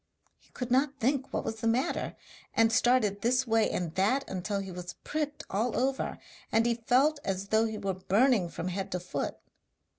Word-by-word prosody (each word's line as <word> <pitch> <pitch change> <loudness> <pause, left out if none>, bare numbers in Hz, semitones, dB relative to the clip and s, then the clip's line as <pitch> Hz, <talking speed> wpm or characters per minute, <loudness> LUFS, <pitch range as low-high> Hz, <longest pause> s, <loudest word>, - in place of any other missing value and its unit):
He - - -27
could 250 -1 -5
not 275 +2 +2
think 265 +2 0
what - - -1
was 225 - -3
the 225 +1 -2
matter, 240 +4 0 0.4
and 225 0 +4
started 225 -4 +3
this 255 +3 +2
way 225 -2 +3
and 170 -3 -2
that 215 +10 +1
until 190 +2 -2
he 195 -1 -4
was 180 0 -7
pricked 295 -1 -3
all 220 +5 -1
over, 265 +2 0 0.3
and 225 +1 +3
he 240 - +3
felt 255 +6 +2
as 195 +1 -3
though 220 +1 +4
he 220 -1 -4
were 195 -2 -2
burning 200 +1 +2
from 175 - -4
head 195 +2 -4
to 180 - -1
foot. 180 +1 -4
225 Hz, 190 wpm, -30 LUFS, 195-255 Hz, 0.4 s, and